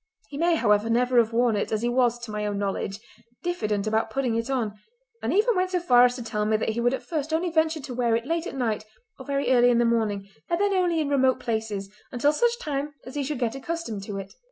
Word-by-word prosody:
He 280 - -7
may, 340 0 +3
however, 210 -5 +2
never 245 +1 +3
have 230 -1 +2
worn 235 -1 +2
it, 205 - -2
as 220 +1 -1
he - - +2
was, 240 -1 +2
to 220 - -8
my 210 0 -3
own 205 -1 -2
knowledge, 200 0 -2 0.4
diffident 215 - -1
about 220 +1 0
putting 270 -4 -1
it 230 +2 -2
on, 240 -6 -1 0.5
and - - -1
even 440 +4 +3
went 370 0 +1
so 365 -1 0
far 245 -8 +6
as 245 0 +1
to 245 - -6
tell 210 -2 -2
me 215 +1 +2
that 220 - -1
he 220 +2 -2
would 245 +2 +2
at - - -9
first 310 -3 -3
only 335 +2 0
venture 320 -1 +1
to 265 -2 -7
wear 240 -2 +1
it 230 +1 -2
late 330 +3 -1
at - - -6
night 225 -5 -1 0.4
or 265 - -10
very 280 -1 0
early 245 -1 +5
in 240 - +3
the 240 - +3
morning, 215 -4 0 0.2
and 340 - +1
then 405 0 +2
only 355 -3 +2
in 300 - -1
remote 265 -2 +3
places, 220 -4 -3 0.2
until 285 +4 +2
such 475 +7 +2
time 295 - -4
as 255 - -9
he 290 - -2
should 290 +1 -3
get 240 -2 -1
accustomed 270 -6 -4
to 200 0 -6
it. 195 0 -7
245 Hz, 260 wpm, -25 LUFS, 220-305 Hz, 0.5 s, far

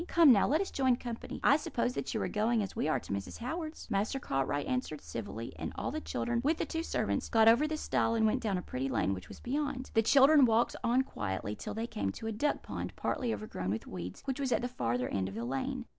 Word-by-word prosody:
'Come, 330 -5 +7
now, 205 -5 +5
let 310 +6 +2
us 395 - -3
join 260 -2 +3
company. 240 -1 -6
I 285 - +6
suppose 245 -4 -1
that 255 - -3
you 220 - -1
are - - 0
going, 220 +1 +1
as 195 - -6
we - - 0
are, 155 - +2
to - - -6
Mrs. 100 0 -4
Howard's.' 315 +6 -5
"Master 205 +6 0
Cartwright 135 - -1
answered 255 - -2
civilly, 115 -1 -6
and - - -4
all - - -3
the - - -3
children, 120 - -1
with 310 +3 +2
the - - -1
two 325 - -3
servants, 330 - -1
got 225 -1 +5
over 235 +7 +6
the 310 0 -2
stile 230 -6 +1
and 220 -1 +3
went 215 - +2
down 200 -4 0
a 180 - -4
pretty 130 +2 -3
lane 95 - +1
which 90 -2 -7
was - - -10
beyond. 270 0 -3
"The 225 - +5
children 275 +4 +7
walked 230 0 +2
on 245 +3 +3
quietly 105 - -4
till 210 - -6
they 225 +1 -2
came 100 - -2
to - - -8
a 225 - -1
duck 285 +8 0
pond, - - -5
partly 245 -4 -1
overgrown 155 - -4
with 110 +3 -2
weeds, 90 0 -7
which 265 0 -2
was 270 -2 -1
at 245 - +2
the - - +1
farther 125 - -1
end 95 -1 -1
of 95 - -9
the 115 +1 -3
lane. 235 - -2
225 Hz, 255 wpm, -32 LUFS, -, -, Come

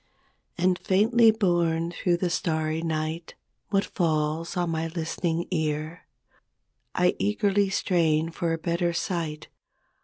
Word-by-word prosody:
And 180 +1 +2
faintly 225 +4 +4
borne 175 -6 +1
through 175 0 0
the 175 0 -1
starry 160 -2 -1
night 160 0 -3 0.3
What 200 -1 +2
falls 160 0 -1
on 175 -2 0
my 160 0 -1
listening 165 +1 -2
ear? 155 0 -2 0.9
I - - +3
eagerly 195 - +1
strain 165 -4 +1
for 170 0 -2
a 165 - 0
better 170 +1 -1
sight. 170 -4 -3
170 Hz, 120 wpm, -26 LUFS, 160-180 Hz, 0.9 s, faintly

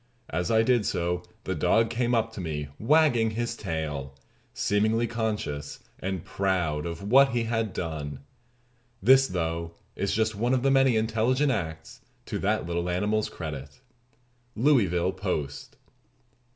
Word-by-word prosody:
As 85 +1 -1
I 110 0 +4
did 120 -3 +2
so 90 +1 -1 0.2
the - - -2
dog 115 0 +2
came 120 +1 +1
up 115 0 0
to 100 - -6
me 75 -4 -4
wagging 125 -3 +4
his 120 0 -1
tail, 75 - -4 0.4
seemingly 110 +3 +1
conscious 105 -11 -3 0.2
and 95 -2 -4
proud 90 -6 -1
of 85 +2 -6
what 135 0 +6
he 120 -1 +1
had 115 -2 -1
done. 75 -6 -5 0.8
This, 135 +1 +6
though, 85 -2 -3 0.2
is 100 - -1
just 110 0 +1
one 120 +5 +1
of 125 - -1
the 135 - +3
many 135 -2 +4
intelligent 115 +6 +2
acts 80 -7 -4 0.2
to - - -3
that - - 0
little 85 +1 -2
animal's 105 +4 0
credit." 70 -4 -7 0.8
_Louisville 95 - +3
Post. 75 -8 -4
105 Hz, 140 wpm, -27 LUFS, 80-115 Hz, 0.8 s, what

